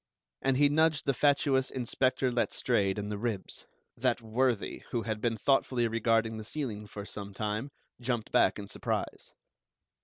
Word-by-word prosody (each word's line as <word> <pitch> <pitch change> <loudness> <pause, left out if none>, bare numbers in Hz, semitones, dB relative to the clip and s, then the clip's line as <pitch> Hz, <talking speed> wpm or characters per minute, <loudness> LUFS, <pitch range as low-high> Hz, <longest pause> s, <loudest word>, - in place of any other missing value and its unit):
And 135 -1 +2
he 145 +1 +6
nudged 155 +1 +2
the 140 - +2
fatuous 140 -1 +3
Inspector 130 +1 0
Letstrayed 115 -4 +1
in 105 0 -3
the 105 -1 -3
ribs. 110 -4 -3 0.3
That - - +1
worthy, 115 0 0
who 120 -3 -1
had 110 -2 -3
been 115 -1 0
thoughtfully 125 0 +2
regarding 115 0 +1
the 110 - -6
ceiling 110 -4 -4
for 100 0 -7
some 100 -1 -7
time, 105 +6 -2 0.3
jumped 120 -2 -2
back - - +4
in 100 -1 -7
surprise. - - -3
115 Hz, 155 wpm, -30 LUFS, 105-130 Hz, 0.3 s, he